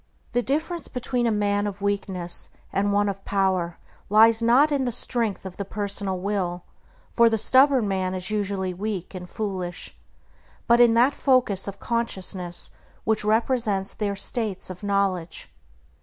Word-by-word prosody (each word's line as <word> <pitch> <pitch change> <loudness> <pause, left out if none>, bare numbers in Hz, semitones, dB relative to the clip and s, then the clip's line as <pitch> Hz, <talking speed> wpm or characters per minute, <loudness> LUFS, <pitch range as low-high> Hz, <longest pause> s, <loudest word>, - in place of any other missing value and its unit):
The 245 - +1
difference 315 +5 -2
between 250 -1 -1
a - - +2
man 205 -1 +1
of 200 -1 -6
weakness 195 -3 -3 0.2
and 200 +1 +1
one 205 0 +2
of 195 -1 -4
power 190 -4 0 0.3
lies 225 +2 +6
not 255 +6 +4
in 275 -2 +1
the 245 - -1
strength 230 -4 -1
of 185 -1 -8
the 200 - -3
personal 200 -1 -3
will 180 -3 -2 0.5
(for 235 -1 +5
the 225 - +1
stubborn 260 +1 +4
man 190 -1 -1
is 185 +3 -2
usually 200 -3 -1
weak 195 -1 -4
and 180 -1 -8
foolish), 185 -5 -4 0.7
but 235 0 +4
in 235 -1 +6
that 250 +5 +4
focus 245 -9 +2
of 200 - -6
consciousness 190 -6 -1 0.3
which 220 -1 +1
represents 215 -2 +1
their 205 -2 -2
states 200 -2 -1
of 180 - -10
knowledge. 195 -4 -1
205 Hz, 155 wpm, -24 LUFS, 190-235 Hz, 0.7 s, lies